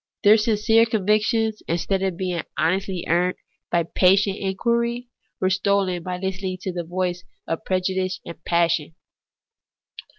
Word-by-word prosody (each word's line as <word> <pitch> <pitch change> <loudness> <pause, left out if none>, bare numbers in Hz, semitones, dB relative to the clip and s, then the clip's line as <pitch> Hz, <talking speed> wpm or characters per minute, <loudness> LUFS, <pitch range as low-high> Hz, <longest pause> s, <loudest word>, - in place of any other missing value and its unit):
Their 210 +2 +7
sincere 225 +1 +3
convictions, 220 +1 +1
instead 175 +3 0
of 190 -3 -1
being 180 -3 -2 0.2
honestly 185 +2 0
earned 175 +2 +2 0.3
by 170 -1 +2
patient 195 +4 +3
inquiring, 235 +5 -1 0.3
were 185 0 +1
stolen 190 -1 +1
by 180 +1 -4
Hstening 190 0 -3
to 190 - -3
the 175 -1 -3
voice 180 +1 -2 0.2
of 165 - -3
prejudice 185 0 -1
and 170 - -10
passion. 165 -2 +1
190 Hz, 130 wpm, -23 LUFS, 175-205 Hz, 0.3 s, Their